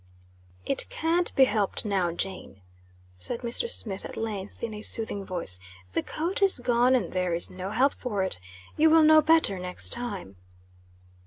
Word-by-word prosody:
"It -, -, -1 dB
can't 335 Hz, +2 st, 0 dB
be 270 Hz, -, +6 dB
helped 215 Hz, -4 st, 0 dB
now, 190 Hz, -4 st, 0 dB
Jane," 175 Hz, -, -6 dB, 0.6 s
said 235 Hz, -, 0 dB
Mr. 245 Hz, -, 0 dB
Smith, 200 Hz, -, +1 dB
at -, -, -8 dB
length, 210 Hz, -3 st, -5 dB
in 230 Hz, -2 st, -3 dB
a 210 Hz, -, -7 dB
soothing 215 Hz, -2 st, 0 dB
voice. 170 Hz, -, -4 dB, 0.3 s
"The -, -, 0 dB
coat 345 Hz, +6 st, -3 dB
is 390 Hz, -5 st, +6 dB
gone, 245 Hz, +1 st, +2 dB
and 250 Hz, -, -1 dB
there 180 Hz, -2 st, 0 dB
is 170 Hz, -, +1 dB
no 185 Hz, +1 st, -6 dB
help 255 Hz, +7 st, +2 dB
for 210 Hz, -6 st, -3 dB
it. 190 Hz, -, -2 dB, 0.4 s
You 315 Hz, +1 st, +5 dB
will 320 Hz, 0 st, +6 dB
know 310 Hz, 0 st, +7 dB
better 315 Hz, -, +3 dB
next 180 Hz, 0 st, -3 dB
time." 200 Hz, -, -4 dB
220 Hz, 170 wpm, -27 LUFS, 185-275 Hz, 0.6 s, know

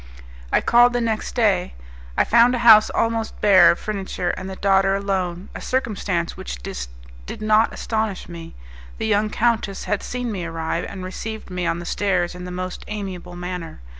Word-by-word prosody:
I -, -, +3 dB
called 240 Hz, +1 st, +5 dB
the 245 Hz, -, +1 dB
next 225 Hz, -2 st, -2 dB
day. 205 Hz, -, +1 dB, 0.4 s
I -, -, +5 dB
found 235 Hz, +2 st, +5 dB
a 240 Hz, -1 st, -3 dB
house 215 Hz, -2 st, +8 dB
almost 225 Hz, -1 st, -1 dB
bare 200 Hz, -3 st, +7 dB
of -, -, +3 dB
furniture, 195 Hz, -4 st, -3 dB
and 190 Hz, +1 st, -6 dB
the 190 Hz, -, -6 dB
daughter 195 Hz, 0 st, +3 dB
alone 190 Hz, -2 st, -2 dB
a -, -, -7 dB
circumstance 200 Hz, -9 st, -2 dB
which -, -, -6 dB
did -, -, -9 dB
not 215 Hz, +1 st, +3 dB
astonish 220 Hz, -3 st, -3 dB
me. 170 Hz, -1 st, -10 dB, 0.4 s
The -, -, -3 dB
young 215 Hz, 0 st, +2 dB
countess 220 Hz, -4 st, 0 dB
had 210 Hz, -, -1 dB
seen 245 Hz, -2 st, -4 dB
me 190 Hz, -4 st, -4 dB
arrive, 165 Hz, 0 st, -3 dB
and 190 Hz, -2 st, -7 dB
received 220 Hz, +2 st, -6 dB
me 180 Hz, -1 st, -2 dB
on 165 Hz, 0 st, 0 dB
the 175 Hz, -, -7 dB
stairs 180 Hz, -2 st, 0 dB
in 180 Hz, 0 st, -8 dB
the -, -, -6 dB
most 185 Hz, 0 st, -5 dB
amiable 190 Hz, -4 st, -6 dB
manner. 180 Hz, -2 st, -6 dB
195 Hz, 180 wpm, -22 LUFS, 175-220 Hz, 0.4 s, house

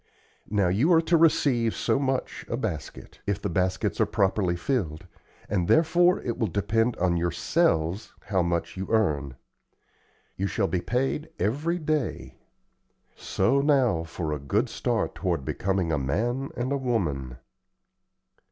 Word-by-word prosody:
Now, 100 Hz, -2 st, +2 dB
you 110 Hz, -, +2 dB
are 165 Hz, -, +6 dB
to 170 Hz, -, +2 dB
receive 145 Hz, -8 st, +3 dB
so -, -, +1 dB
much 135 Hz, -2 st, -2 dB
a -, -, -1 dB
basket, -, -, -5 dB
if 100 Hz, -1 st, 0 dB
the -, -, -3 dB
baskets 95 Hz, +2 st, 0 dB
are -, -, +3 dB
properly 95 Hz, -2 st, +1 dB
filled, 85 Hz, -, -2 dB, 0.4 s
and 90 Hz, -4 st, 0 dB
therefore 175 Hz, +3 st, +4 dB
it 120 Hz, -, -3 dB
will 110 Hz, -, +1 dB
depend 115 Hz, +5 st, 0 dB
on 90 Hz, -1 st, +1 dB
yourselves 85 Hz, +2 st, 0 dB
how 95 Hz, -3 st, 0 dB
much 85 Hz, -1 st, -1 dB
you 95 Hz, +1 st, -4 dB
earn. 75 Hz, -, +1 dB, 1.0 s
You 100 Hz, -, 0 dB
shall 100 Hz, -, 0 dB
be 90 Hz, -2 st, -1 dB
paid 135 Hz, -, -1 dB
every 150 Hz, -, 0 dB
day. 155 Hz, -5 st, -2 dB, 0.8 s
So 140 Hz, +1 st, +1 dB
now 130 Hz, -, +2 dB
for 80 Hz, -1 st, -4 dB
a 75 Hz, -, -3 dB
good 70 Hz, 0 st, 0 dB
start -, -, -1 dB
toward 85 Hz, -7 st, -2 dB
becoming 95 Hz, -1 st, -1 dB
a 75 Hz, -, +1 dB
man 120 Hz, -, -1 dB
and 125 Hz, +2 st, -2 dB
a 140 Hz, -, +1 dB
woman." 75 Hz, -, -2 dB
100 Hz, 145 wpm, -26 LUFS, 85-135 Hz, 1.0 s, are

